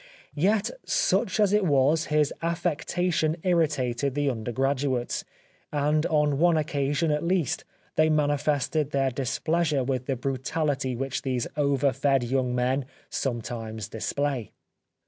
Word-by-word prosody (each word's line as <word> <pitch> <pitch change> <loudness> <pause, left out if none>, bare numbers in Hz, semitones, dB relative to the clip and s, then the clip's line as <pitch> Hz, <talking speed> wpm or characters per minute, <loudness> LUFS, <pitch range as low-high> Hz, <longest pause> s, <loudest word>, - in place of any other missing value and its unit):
Yet, 200 +7 +1
such - - +1
as 205 -1 +4
it 210 -1 +4
was, 150 0 +3
his 150 -1 +1
affecta 170 +1 -1
tion 155 +1 +1
irritated 140 -7 +1
the 145 -1 +1
undergraduates, 130 +2 -1 0.5
and 150 +2 +1
on 150 -2 +2
one 170 0 +4
oc 155 - +1
casion, 145 +1 0
at 150 0 0
least, 170 -5 0 0.3
they 155 0 +5
manifested 150 -1 +1
their 135 -2 +1
displeasure 150 +3 0
with 130 -1 -2
the 135 - 0
brutality 135 +1 -1
which 135 +2 -3
these 130 -3 -1
over 140 -2 +2
fed 135 -1 +2
young 125 0 0
men 130 +2 +1 0.3
sometimes 115 -4 -3
display. 130 +1 -2
145 Hz, 130 wpm, -26 LUFS, 130-155 Hz, 0.5 s, they